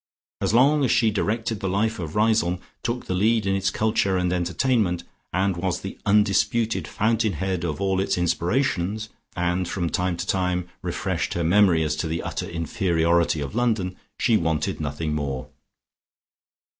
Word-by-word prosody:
As - - +1
long 140 +6 +4
as 130 - +2
she 115 -2 +3
directed 110 +1 -1
the 95 - -2
life 110 +3 0
of 80 -3 -5
Riseholme, 105 -5 +2 0.2
took 120 +1 -3
the - - -2
lead 110 +3 +2
in 95 - +1
its 95 0 +1
culture 100 -2 +1
and 90 0 0
entertainment, 90 +1 +1 0.3
and 95 +1 +1
was 90 +1 -2
the 95 - -7
undisputed 105 +2 +2
fountain 110 -1 +1
head 90 +1 -2
of 80 -2 -2
all 95 -1 +1
its 95 - 0
inspirations, 100 +3 0 0.3
and 90 +1 0
from 85 -2 -2
time 90 -1 0
to 85 - -3
time 90 -2 0
refreshed - - -2
her 85 - 0
memory 90 -1 +4
as 75 -1 0
to 80 - -2
the 80 +1 -3
utter - - -4
inferiority 85 -1 +1
of 70 - -5
London 110 -6 0 0.2
she 115 -3 +3
wanted 80 0 -1
nothing 75 +1 -2
more. 70 -3 -3
95 Hz, 165 wpm, -24 LUFS, 85-110 Hz, 0.3 s, long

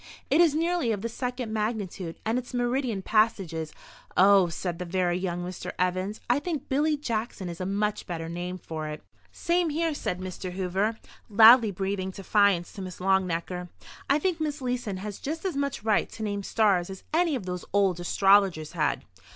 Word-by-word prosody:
It 300 +5 +6
is 320 -4 +4
nearly 335 -6 +1
of 205 -1 -3
the 230 - -1
second 245 -1 -4
magnitude, 210 -6 -3
and 225 +3 +1
its 250 0 -8
meridian 245 -4 0
passage 215 -5 +2
is—" 160 -1 -4 0.5
"Oh," 195 0 +6
said 170 0 -4
the - - -2
very 180 0 0
young 175 -1 -2
Mr. 180 0 -6
Evans, 185 +3 -1
"I 245 +3 +3
think 295 -3 -4
Billy 295 +3 +1
Jackson 225 -7 -3
is 170 +1 -6
a 185 - -2
much 210 +1 -1
better 165 -3 -4
name 175 +2 -4
for 160 -3 -6
it." 150 0 -7 0.3
"Same 345 0 +1
here," 325 +1 0
said 180 -10 -3
Mr. 185 0 -6
Hoover, 195 +4 -1 0.3
loudly 225 +2 +8
breathing 195 0 -2
defiance 195 -2 +2
to 200 - -7
Miss 185 -1 -7
Longnecker. 180 -1 0 0.4
"I 280 - +5
think 335 +1 -1
Miss 300 -1 -2
Leeson 245 -6 -2
has 205 +1 -6
just 320 +5 -4
as 370 - -1
much 280 -5 -2
right 215 -2 +2
to 220 - -6
name 205 -1 -2
stars 195 -4 +2
as 190 -1 -8
any 330 -2 +3
of 230 -8 -4
those 180 -1 -4
old 195 -3 +2
astrologers 190 -3 +3
had." 150 -6 0
200 Hz, 185 wpm, -27 LUFS, 180-245 Hz, 0.5 s, loudly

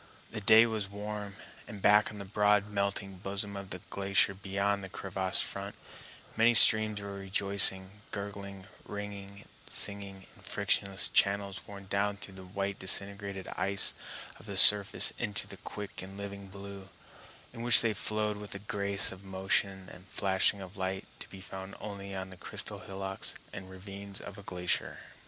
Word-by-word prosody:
The 110 - -4
day 110 +2 +7
was 110 -4 -3
warm, 105 0 -6 0.3
and 105 -3 -8
back 105 +1 +4
on 105 - -9
the 100 - -7
broad 105 0 +2
melting 100 -2 -3
bosom 100 +2 -2
of 100 -1 -7
the 90 -1 -6
glacier 100 0 +2
beyond 100 +1 -2
the 95 - -7
crevassed 95 -2 +2
front, 100 +1 -6 0.6
many 115 +1 +4
streams 110 -1 +7
were 100 0 -7
rejoicing, 100 0 +1
gurgling, 100 -2 -7 0.2
ringing, 100 -1 -8 0.2
singing, 100 -2 -2
in - - -18
frictionless 100 0 0
channels 100 -1 +1
worn 100 -1 -10
down 100 +1 -1
through 100 - -5
the 95 0 -10
white 100 +1 -4
disintegrated 100 0 +1
ice 100 +2 +1 0.5
of - - -13
the 100 -1 -5
surface 100 0 +7
into 105 - -2
the - - -11
quick 105 -1 -8
and 95 +1 -10
living 100 -1 -7
blue, 100 0 -10 0.6
in 115 - -8
which 120 -1 +7
they 115 -2 +1
flowed 105 +1 -1
with 105 -1 -8
a - - -3
grace 100 -1 +3
of 95 0 -12
motion 95 0 -1
and 90 +2 -15
flashing 95 +1 +1
of 95 +1 -10
light 95 0 -3
to - - -9
be 95 - -11
found 95 0 -9
only 100 -1 -7
on 95 0 -6
the 95 - -12
crystal - - -5
hillocks 95 0 -5 0.2
and 95 0 -8
ravines 100 +1 -9
of 100 - -10
a - - -9
glacier. 90 -2 -2
100 Hz, 165 wpm, -30 LUFS, 95-100 Hz, 0.6 s, day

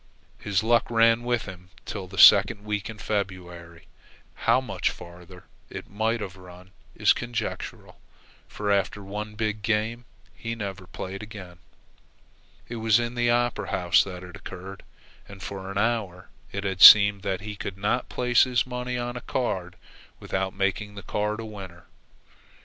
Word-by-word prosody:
His 105 -1 0
luck 120 +1 +2
ran 115 0 +4
with 120 -2 -1
him 90 -2 -11 0.2
till 95 -3 -6
the 95 +1 -11
second 100 +4 +7
week 105 0 -3
in 110 - -8
February. 90 -5 -5 0.5
How 115 +2 +2
much 100 -8 -2
farther 90 +1 -12 0.3
it - - -9
might 110 +2 -1
have 95 -2 -6
run 90 0 -14 0.2
is - - +4
conjectural; 120 -1 -5 0.5
for, 105 -1 -3
after 100 +1 0
one 105 +2 -6
big 110 -1 -2
game, 115 +3 -1 0.3
he 115 0 -5
never 100 -4 -6
played 95 +2 -7
again. 95 -5 -10 1.1
It 120 - -6
was 110 0 +3
in 120 0 -3
the 120 -1 +1
Opera 120 0 0
House 85 -1 +3
that 90 -2 -8
it 90 -1 -10
occurred, 95 +1 -9 0.5
and 100 -1 -11
for 95 -1 -6
an 100 - -5
hour 100 -5 -1 0.2
it 100 - -4
had 95 -1 -3
seemed 100 -2 +10
that 95 -1 -3
he 105 0 -6
could 100 -1 -6
not 105 +5 -1
place 125 -1 +3
his 125 -2 +1
money 125 0 -4
on 120 0 -4
a 125 - -6
card 95 -10 -3 0.4
without 95 0 -3
making 100 +1 -2
the 100 - -9
card 105 +1 -2
a 115 - -5
winner. 95 -5 -10
100 Hz, 160 wpm, -26 LUFS, 95-115 Hz, 1.1 s, seemed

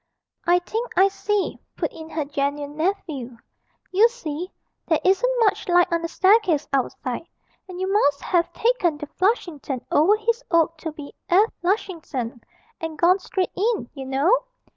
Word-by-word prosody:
'I 350 +1 +6
think 460 +2 -3
I 385 +2 +6
see,' 400 0 -1 0.2
put - - -2
in 320 -1 -10
her 310 -2 -2
genuine 285 +1 -2
nephew; 310 - -3 0.5
'you 425 +5 +5
see, 360 -7 -6 0.4
there 320 -2 +3
isn't - - +3
much 425 -3 +2
light 355 0 +4
on 335 - +1
the 335 - -2
staircase 375 -4 +3
outside, 260 +2 -2 0.4
and 360 -1 -7
you 375 - 0
must 335 -8 +2
have 345 -1 +1
taken 410 -10 +1
the 295 - -6
"Flushington" 310 - -1
over 340 +8 +5
his 460 +3 -1
oak 330 -1 +3
to 320 0 -4
be 300 -2 -10 0.2
"F. 405 +6 +4
Lushington," 325 - -2 0.4
and 325 -1 -5
gone 360 +4 +4
straight 375 0 -2
in, 425 - 0
you 270 -2 -7
know. 315 - +2
345 Hz, 160 wpm, -23 LUFS, 295-400 Hz, 0.5 s, I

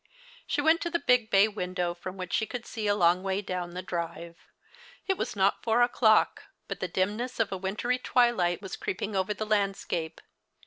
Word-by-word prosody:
She 290 - 0
went 320 +3 +4
to 340 - -1
the 340 - +1
big 250 -8 +2
bay 200 0 +5
windoAV 180 -4 -3
from 185 +2 -7
which 185 -1 -6
she 220 - +1
could 245 -2 -6
see 220 -3 -4
a 205 - +3
long 175 -1 +3
way 190 0 -1
down 180 -2 -4
the 180 - -4
drive. 170 -1 -5 0.7
It 385 - +1
was 245 - -3
not 195 0 +2
four 235 +2 +3
o'clock, 225 -3 +3 0.2
but - - -5
the 185 - -2
dimness 210 +8 -2
of 225 -3 +1
a 190 - -2
wintry 210 +7 -1
tAvilight 225 -9 +2
was 195 - -5
creeping 205 +2 -3
over 190 +2 0
the 215 - -3
landscape. 195 -6 -1
200 Hz, 195 wpm, -28 LUFS, 180-230 Hz, 0.7 s, bay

